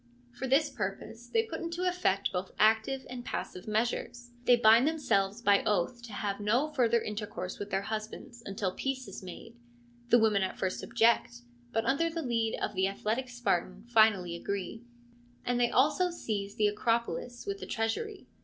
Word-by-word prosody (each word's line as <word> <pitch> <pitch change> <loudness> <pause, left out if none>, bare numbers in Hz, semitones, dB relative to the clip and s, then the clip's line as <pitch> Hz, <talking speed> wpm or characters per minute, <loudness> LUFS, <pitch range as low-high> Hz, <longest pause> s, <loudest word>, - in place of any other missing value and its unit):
For 265 - -5
this 285 +3 +3
purpose 220 +2 -5
they 450 - +2
put 330 -8 -6
into 340 +2 -2
effect 205 - +1
both 180 +1 -3
active 220 +5 +3
and 250 -1 -7
passive 180 -5 -5
measures: 240 +2 -2
they 245 - +7
bind 235 +3 +6
themselves 235 -9 0
by 200 -2 +4
oath 210 +4 0
to 235 -3 -10
have 200 0 -2
no 235 +9 +1
further 235 -5 +2
intercourse 210 -4 -5
with 205 - -5
their 195 0 -1
husbands 220 +4 -6
until 195 -2 -2
peace 265 -2 -3
is 195 - -8
made 230 +5 -10 0.5
(the 240 - +7
women 220 -3 +3
at 190 - -2
first 190 -1 -2
object, 225 - +2 0.3
but 225 - 0
under 305 +5 +2
the 330 0 -4
lead 230 -3 0
of 210 - -2
the 190 -1 +2
athletic 220 +6 -2
Spartan 200 -5 -1
finally 215 -7 +4
agree), 200 +5 -4 0.6
and 245 0 +1
they 240 -1 +3
also 305 +9 +3
seize 205 - -4
the 215 - +2
Acropolis 235 +3 -1
with 400 0 -3
the - - -7
treasury. 370 - -2
225 Hz, 175 wpm, -30 LUFS, 200-255 Hz, 0.6 s, they